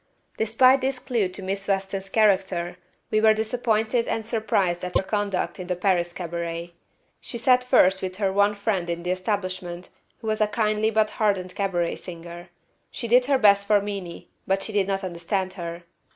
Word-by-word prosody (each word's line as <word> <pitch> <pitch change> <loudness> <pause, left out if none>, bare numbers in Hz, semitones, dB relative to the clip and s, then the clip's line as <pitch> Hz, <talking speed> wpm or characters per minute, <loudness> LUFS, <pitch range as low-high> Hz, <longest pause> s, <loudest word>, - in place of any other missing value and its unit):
Despite 255 +5 +4
this 265 0 -1
clue 235 -6 0
to 190 +1 -8
Miss 195 +1 -3
Weston's 195 0 -2
character, 190 -5 +1 0.3
we 215 - +3
were 220 0 +6
disappointed 225 +1 0
and 225 - -2
surprised 200 -6 0
at 180 - -5
her - - 0
conduct 195 -3 -2
in 180 - -6
the 180 - -1
Paris 175 -2 +1
cabaret. 170 -1 -5 0.5
She 235 - -6
sat 250 +1 +4
first 190 -6 +4
with 185 -1 -4
her 195 -1 0
one 205 +1 +3
friend 200 -4 -1
in 170 0 -3
the 180 - -1
establishment, 185 -2 -3 0.3
who 230 - -13
was 215 0 -1
a 215 - +4
kindly 215 0 +1
but 220 -1 +2
hardened 195 -4 0
cabaret 180 -4 -1
singer. 170 0 -10 0.4
She 235 - -6
did 250 +2 +4
her 280 -1 +4
best 200 -3 +4
for 210 -1 +5
Meenie, 195 -4 -6 0.2
but 195 0 +1
she 220 - -5
did 200 -2 +2
not 195 0 -1
understand 185 +2 -2
her. 170 -2 -6
195 Hz, 180 wpm, -24 LUFS, 180-215 Hz, 0.5 s, were